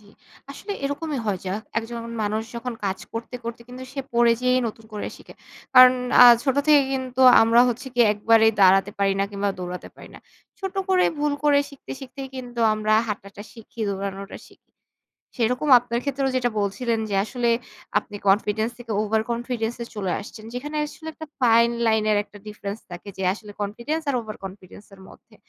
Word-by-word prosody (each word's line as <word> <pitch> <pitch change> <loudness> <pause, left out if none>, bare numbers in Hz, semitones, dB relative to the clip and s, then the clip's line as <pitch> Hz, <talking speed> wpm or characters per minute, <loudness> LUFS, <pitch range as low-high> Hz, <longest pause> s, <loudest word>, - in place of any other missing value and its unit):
জি। - - -23 0.5
আসলে 395 +9 -6
এরকমই 285 0 -3
হয় 200 -3 0
যা 185 - -1 0.2
একজন 230 +1 -6 0.2
মানুষ 215 +1 -1
যখন 250 +1 -4
কাজ 190 -1 -1
করতে, 230 +2 -6
করতে, 235 0 -6
কিন্তু 250 +1 -9
সে 275 - -3
পড়ে 235 0 +4
যেয়েই 250 0 +3
নতুন 225 0 -7
করে 210 - -4
শিখে। - - -15 0.4
কারণ 255 0 +10 0.3
আ - - +11 0.2
ছোট 270 -1 0
থেকে 295 -2 +6
কিন্তু 260 -1 -3 0.2
আমরা 230 +1 +5
হচ্ছে 245 +3 -4
গিয়ে 240 -2 +5
একবারেই 220 +1 +4
দাঁড়াতে 195 +1 +5
পারি 195 -1 +2
না 195 - +2
কিংবা 200 0 -2
দৌড়াতে 180 0 -6
পারি - - -13
না। - - -11 0.4
ছোট 385 -1 -4
করে 370 -1 +4
ভুল 295 0 +1
করে 290 -1 +5
শিখতে, 280 -2 -14
শিখতেই 270 0 -8
কিন্তু 245 -2 -6
আমরা 215 0 0 0.2
হাঁটাটা 200 -1 -6
শিখি, 225 0 -13
দৌড়ানোটা 195 0 -5
শিখি। - - -25 0.7
সেরকম 250 +5 0
আপনার 240 0 -3
ক্ষেত্রেও 275 -1 -1
যেটা 250 -1 +1
বলছিলেন 225 +3 -1
যে 200 - -1
আসলে 240 +1 -1 0.5
আপনি 205 - -12
confidence 215 +3 +2
থেকে 235 -2 -8
over 215 +1 +1
confidence 235 -1 -3
এ - - -8
চলে 195 -4 -2
আসছেন, 215 +1 -11
যেখানে 295 +5 -5
আসলে 300 +2 -11
একটা 315 - -9 0.2
fine 235 -1 +4
line 220 -1 +2
এর 210 - +3
একটা 205 0 -16
difference 210 0 -6
থাকে 175 +3 -8
যে 190 - -4
আসলে 210 +1 -11
confidence 235 +11 -3
আর 275 - +1
over 215 -2 -8
confidence 190 +1 -11
এর 190 - -15
মধ্যে। - - -19
230 Hz, 185 wpm, -23 LUFS, 205-255 Hz, 0.7 s, আ